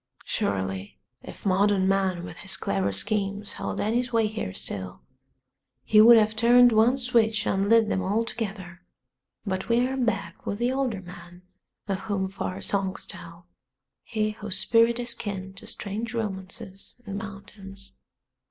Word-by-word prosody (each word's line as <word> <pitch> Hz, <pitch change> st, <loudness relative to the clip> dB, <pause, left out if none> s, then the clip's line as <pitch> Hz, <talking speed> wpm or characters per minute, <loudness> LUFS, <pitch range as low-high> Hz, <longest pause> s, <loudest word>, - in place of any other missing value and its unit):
Surely 95 Hz, 0 st, -2 dB, 0.2 s
if -, -, -12 dB
modern 195 Hz, 0 st, +3 dB
man 190 Hz, -2 st, +1 dB
with 165 Hz, -1 st, -8 dB
his 190 Hz, -, -3 dB
clever 100 Hz, 0 st, 0 dB
schemes 200 Hz, -, -2 dB
held -, -, -4 dB
any 225 Hz, +4 st, +1 dB
sway 235 Hz, -3 st, +1 dB
here 215 Hz, -, -3 dB
still 95 Hz, -1 st, -4 dB, 0.8 s
he 215 Hz, 0 st, +6 dB
would 235 Hz, +1 st, +9 dB
have 215 Hz, 0 st, +3 dB
turned 240 Hz, +2 st, +6 dB
one 225 Hz, +4 st, +4 dB
switch 230 Hz, -4 st, +2 dB
and 195 Hz, +1 st, +1 dB
lit 225 Hz, -1 st, +5 dB
them 190 Hz, -, 0 dB
all 205 Hz, +5 st, 0 dB
together; 195 Hz, -6 st, -5 dB, 0.6 s
but 190 Hz, 0 st, -3 dB
we 235 Hz, +2 st, +3 dB
are 265 Hz, -, -3 dB
back 225 Hz, -6 st, -2 dB
with 200 Hz, -, -3 dB
the 240 Hz, +3 st, +1 dB
older 260 Hz, -7 st, -1 dB
man 175 Hz, 0 st, -12 dB, 0.4 s
of 195 Hz, -2 st, -1 dB
whom 195 Hz, -2 st, -2 dB
far 190 Hz, -1 st, -4 dB
songs 195 Hz, -1 st, -2 dB
tell, 170 Hz, -2 st, -10 dB, 0.6 s
he 215 Hz, -2 st, -1 dB
whose 210 Hz, -2 st, -4 dB
spirit 230 Hz, +3 st, +4 dB
is 240 Hz, -1 st, +2 dB
kin 190 Hz, -2 st, -5 dB
to 195 Hz, -, -12 dB
strange 220 Hz, +4 st, -4 dB
romances 195 Hz, -1 st, -6 dB
and 200 Hz, -1 st, -4 dB
mountains. 195 Hz, -1 st, -8 dB
200 Hz, 150 wpm, -26 LUFS, 190-225 Hz, 0.8 s, would